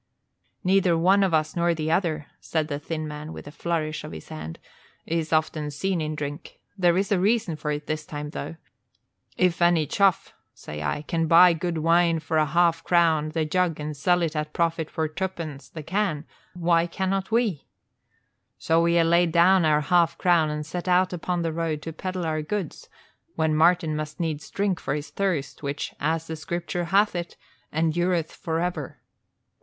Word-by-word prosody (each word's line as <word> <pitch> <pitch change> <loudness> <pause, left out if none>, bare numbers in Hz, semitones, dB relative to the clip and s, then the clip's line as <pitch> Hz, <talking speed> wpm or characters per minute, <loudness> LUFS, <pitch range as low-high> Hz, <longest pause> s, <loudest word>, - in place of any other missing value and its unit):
"Neither 185 -2 +3
one 190 +4 +4
of 190 - +1
us 155 -1 +1
nor 170 0 +2
the 155 0 -2
other," 160 -4 0
said 160 -1 -2
the 145 -1 -3
thin 155 +1 -4
man, 150 +1 -7
with - - -9
a 145 - -9
flourish 155 -1 -2
of - - -8
his 80 - -10
hand, 80 +1 -7 0.5
"is 165 -1 -2
often 155 -1 0
seen 175 +4 -1
in 155 0 -3
drink. 145 0 -6 0.2
There 175 -3 +3
is 195 +1 0
a 195 - +3
reason 200 -3 +1
for 150 0 -5
it 150 0 -3
this 155 0 -3
time, 150 -1 -6
though. 165 - -6 0.8
'If 180 -2 +2
any 175 -2 +4
chuff,' 195 +4 +1 0.2
say 75 0 -8
I, 75 - -2
'can 165 +1 -1
buy 170 +2 +7
good 170 0 -2
wine 165 +1 +3
for 160 0 -2
a 155 - +2
half 165 +1 +2
crown 165 -3 +3
the 160 0 -1
jug 170 0 0
and 150 0 -4
sell 175 +5 +2
it 160 -1 -2
at 150 0 -3
profit 165 -2 0
for 160 -1 -1
tuppence 155 -5 -5
the 155 - -8
can, 165 -2 -1 0.3
why 170 -1 +2
cannot 190 +2 -2
we?' 220 - 0 0.9
So 165 +1 +2
we 170 0 +3
ha' 170 - +5
laid 170 0 +3
down 175 +1 +5
our 150 -1 +3
half 170 +2 +2
crown 170 -4 +3
and 150 0 -4
set 175 +3 -5
out 180 +1 +3
upon 175 0 -2
the 165 -1 -1
road 160 -2 -2
to 165 - -6
peddle 185 +1 -4
our 155 -1 -1
goods, 180 +1 -5 0.5
when 160 -1 +1
Martin 165 0 +3
must 155 0 -5
needs 155 -4 -3
drink 195 -3 -1
for 140 - -2
his 150 0 -6
thirst, 185 -8 -2
which, 140 0 -4
as 160 +2 0
the 160 - -5
Scripture 175 +2 -3
hath 200 +4 +3
it, 175 0 -5 0.3
endureth 165 +1 0
forever. 165 -3 -3
165 Hz, 185 wpm, -25 LUFS, 155-175 Hz, 0.9 s, buy